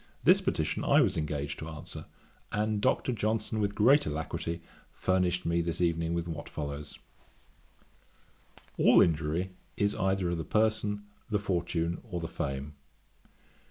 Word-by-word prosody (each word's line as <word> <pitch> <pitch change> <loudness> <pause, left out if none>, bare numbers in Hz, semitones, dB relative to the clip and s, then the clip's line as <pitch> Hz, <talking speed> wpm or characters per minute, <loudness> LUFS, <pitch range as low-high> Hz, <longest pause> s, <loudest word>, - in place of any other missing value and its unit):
This - - +6
petition - - -1
I 145 +2 +5
was 100 -8 +2
engaged 75 -2 -2
to 80 - -6
answer, 80 0 -8 0.5
and 105 0 0
Dr. 130 +1 +2
Johnson 110 -1 -1
with 100 -1 0
great 135 +7 +5
alacrity 85 +2 -3 0.3
furnished 90 -1 +1
me 85 +1 +2
this 85 0 -2
evening 85 -1 +1
with 85 0 -2
what 80 -2 -6
follows: 75 0 -5 1.8
'All - - +7
injury 80 +3 +2 0.3
is 100 +1 +2
either 95 -2 0
of 85 - -1
the - - -2
person, 105 -1 +1 0.3
the 105 - +2
fortune, 85 -4 -1
or 100 -8 -5
the 80 - -3
fame. 70 -1 -4
85 Hz, 140 wpm, -30 LUFS, 80-105 Hz, 1.8 s, All